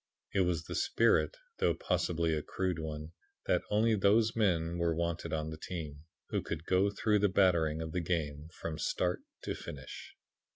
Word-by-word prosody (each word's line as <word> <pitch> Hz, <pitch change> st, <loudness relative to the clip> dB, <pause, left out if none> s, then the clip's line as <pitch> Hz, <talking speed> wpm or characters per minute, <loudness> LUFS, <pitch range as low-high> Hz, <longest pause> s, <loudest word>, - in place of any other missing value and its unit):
"It 100 Hz, -, +2 dB
was 90 Hz, -3 st, +1 dB
the -, -, -6 dB
spirit, -, -, +3 dB, 0.2 s
though -, -, +3 dB
possibly 85 Hz, -1 st, 0 dB
a 75 Hz, -, 0 dB
crude 90 Hz, +1 st, -2 dB
one, 80 Hz, 0 st, -5 dB, 0.3 s
that -, -, +2 dB
only 110 Hz, +2 st, +3 dB
those 110 Hz, +3 st, +4 dB
men 85 Hz, -6 st, +1 dB
were 85 Hz, -1 st, +2 dB
wanted 85 Hz, 0 st, -2 dB
on 80 Hz, -1 st, -2 dB
the 80 Hz, -, -7 dB
team 80 Hz, -4 st, -6 dB, 0.2 s
who -, -, 0 dB
could 80 Hz, -, -5 dB
go 95 Hz, +3 st, +3 dB
through 105 Hz, +1 st, +2 dB
the 105 Hz, 0 st, +3 dB
battering 85 Hz, -4 st, +3 dB
of 80 Hz, -, -5 dB
the 90 Hz, -, -1 dB
game 80 Hz, -3 st, -2 dB
from 80 Hz, -2 st, -5 dB
start 90 Hz, +4 st, 0 dB, 0.2 s
to -, -, -2 dB
finish. 70 Hz, -3 st, -8 dB
85 Hz, 175 wpm, -32 LUFS, 80-95 Hz, 0.3 s, those